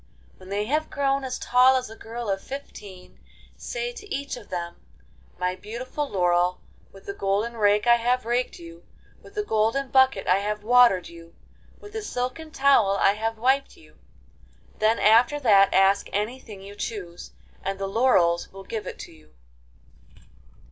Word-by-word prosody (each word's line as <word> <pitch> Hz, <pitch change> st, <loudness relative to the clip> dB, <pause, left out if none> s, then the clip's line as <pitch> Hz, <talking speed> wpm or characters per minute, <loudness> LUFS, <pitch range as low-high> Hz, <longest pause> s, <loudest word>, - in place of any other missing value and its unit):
When 185 Hz, 0 st, -14 dB
they 205 Hz, +1 st, -1 dB
have 305 Hz, +6 st, -1 dB
grown 275 Hz, -1 st, 0 dB
as 255 Hz, -1 st, -4 dB
tall 255 Hz, +1 st, +4 dB
as 255 Hz, -1 st, -1 dB
a 220 Hz, -, -11 dB
girl 230 Hz, +1 st, -7 dB
of 195 Hz, -1 st, -1 dB
fifteen, 205 Hz, -9 st, -10 dB, 0.4 s
say -, -, -4 dB
to 415 Hz, -4 st, -12 dB
each 280 Hz, +1 st, -3 dB
of 240 Hz, -4 st, -13 dB
them, 170 Hz, -1 st, -5 dB, 0.6 s
''My 180 Hz, 0 st, -1 dB
beautiful 255 Hz, +7 st, -5 dB
laurel, 180 Hz, -1 st, +1 dB, 0.3 s
with 195 Hz, -, -16 dB
the 200 Hz, -, -5 dB
golden 200 Hz, +4 st, -1 dB
rake 210 Hz, -1 st, +2 dB
I 235 Hz, 0 st, +6 dB
have 245 Hz, +1 st, 0 dB
raked 240 Hz, +2 st, -1 dB
you, 170 Hz, 0 st, -13 dB, 0.4 s
with -, -, -17 dB
the 420 Hz, -, -1 dB
golden 230 Hz, -, 0 dB
bucket 265 Hz, -7 st, +3 dB
I 185 Hz, -, +3 dB
have 210 Hz, +1 st, -3 dB
watered 235 Hz, -5 st, +4 dB
you, 170 Hz, 0 st, -14 dB, 0.4 s
with 415 Hz, 0 st, -13 dB
the 440 Hz, -, -4 dB
silken 255 Hz, -3 st, -4 dB
towel 270 Hz, -9 st, +3 dB
I 195 Hz, -, +4 dB
have 225 Hz, +2 st, -3 dB
wiped 265 Hz, +4 st, 0 dB
you.'' -, -, -21 dB, 0.8 s
Then 220 Hz, +2 st, +3 dB
after 235 Hz, +7 st, +4 dB
that 200 Hz, -7 st, +5 dB
ask 195 Hz, +1 st, +3 dB
anything 210 Hz, -1 st, -4 dB
you 200 Hz, +1 st, -10 dB
choose, 195 Hz, -4 st, -7 dB, 0.3 s
and 195 Hz, 0 st, -3 dB
the 195 Hz, -, -3 dB
laurels 195 Hz, -6 st, +2 dB
will 195 Hz, 0 st, -11 dB
give 215 Hz, +2 st, -6 dB
it -, -, -7 dB
to -, -, -16 dB
you. 75 Hz, -2 st, -21 dB
220 Hz, 170 wpm, -25 LUFS, 195-255 Hz, 0.8 s, I